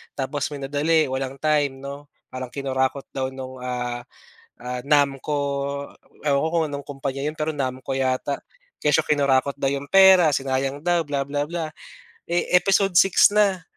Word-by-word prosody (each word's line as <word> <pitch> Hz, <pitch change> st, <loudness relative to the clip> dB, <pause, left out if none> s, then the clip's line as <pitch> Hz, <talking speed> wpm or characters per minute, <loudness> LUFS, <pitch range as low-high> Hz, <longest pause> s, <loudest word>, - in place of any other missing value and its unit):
tapos 140 Hz, 0 st, -2 dB
minadali, 145 Hz, +3 st, +1 dB
walang 135 Hz, 0 st, -3 dB
time, 145 Hz, -3 st, +1 dB
'no? 140 Hz, +1 st, -8 dB, 0.2 s
Parang 130 Hz, 0 st, -5 dB
kinurakot 135 Hz, 0 st, -1 dB
daw 130 Hz, -1 st, -2 dB
nung, 130 Hz, -1 st, -8 dB
ah, 125 Hz, -1 st, -3 dB, 0.6 s
ah, 125 Hz, +1 st, -5 dB
NAMCO 145 Hz, 0 st, +1 dB, 0.9 s
ewan 140 Hz, -1 st, +3 dB
ko, 160 Hz, -, +1 dB
kung 165 Hz, -1 st, +1 dB
anong 145 Hz, -1 st, -6 dB
kumpanya 135 Hz, -1 st, -4 dB
'yon, 150 Hz, +1 st, -2 dB
pero 155 Hz, +1 st, 0 dB
NAMCO 130 Hz, -1 st, -3 dB
yata. 130 Hz, +1 st, -1 dB, 0.4 s
Kesyo 150 Hz, +1 st, +3 dB
kinurakot 140 Hz, -2 st, +2 dB
daw 140 Hz, -, -1 dB
'yong 140 Hz, 0 st, -4 dB
pera, 190 Hz, -4 st, +7 dB
sinayang 135 Hz, +2 st, -2 dB
daw, 175 Hz, -1 st, +2 dB
bla 140 Hz, -1 st, -1 dB
bla 145 Hz, +1 st, -2 dB
bla. 165 Hz, -2 st, -4 dB, 0.6 s
Eh, 175 Hz, 0 st, 0 dB
episode 195 Hz, -1 st, +2 dB
6 195 Hz, +1 st, +5 dB
na 200 Hz, -4 st, +2 dB
140 Hz, 155 wpm, -23 LUFS, 135-155 Hz, 0.9 s, pera